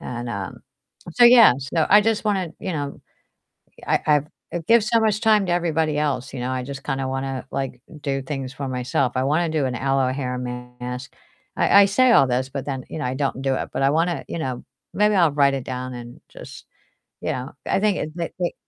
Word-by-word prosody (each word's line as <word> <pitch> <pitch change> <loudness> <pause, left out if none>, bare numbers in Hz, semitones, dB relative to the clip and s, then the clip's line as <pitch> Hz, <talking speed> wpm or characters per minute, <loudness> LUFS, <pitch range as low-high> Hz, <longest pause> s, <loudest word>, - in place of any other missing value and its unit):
and, 120 -1 -6
um 100 -4 -5 0.6
so 240 - +5
yeah, 235 - +8
so, 140 +4 -1
I 205 - +8
just 225 0 0
wanna, 195 -5 0
you 185 - -3
know, 145 -3 -4 0.9
I - - +2
I've 150 -1 +3 0.3
I - - 0
give 230 -1 +5
so 230 +1 +2
much 215 -1 +1
time 215 -3 +4
to 175 - 0
everybody 160 -3 0
else, 140 -3 -2
you 125 - -5
know? 125 - -2
I 130 -1 -3
just 135 0 -7
kinda 135 -2 -2
wanna, 135 0 -4
like, 135 -2 -4 0.2
do 135 -1 -2
things 135 -1 -5
for 140 - -5
myself. 125 0 -1
I 130 - +1
wanna 160 +4 +1
do 155 -3 0
an 125 - -3
aloe 135 -1 +1
hair 130 -2 -3
mask. 125 +1 -7 0.4
I 200 - +6
I - - +6
say 255 +6 +3
all 135 - +6
this, 130 +1 0
but 140 0 -5
then, 135 -2 -3
you - - -5
know, 150 - -3
I 125 - -2
don't 135 -1 -2
do 135 -1 +1
it. - - -4
But - - -2
I 135 - +4
wanna, 165 +3 0
you - - -4
know 130 -4 -4 0.3
maybe 210 +1 +3
I'll 170 -4 +4
write 140 -1 +3
it 135 - -3
down 130 0 -5
and 120 0 -10
just, - - -12 0.6
you - - -1
know. 130 +2 -5
I - - +1
think 210 -2 +1
it - - -3
it 170 -1 -4
it 175 -1 -1
140 Hz, 225 wpm, -22 LUFS, 130-175 Hz, 0.9 s, yeah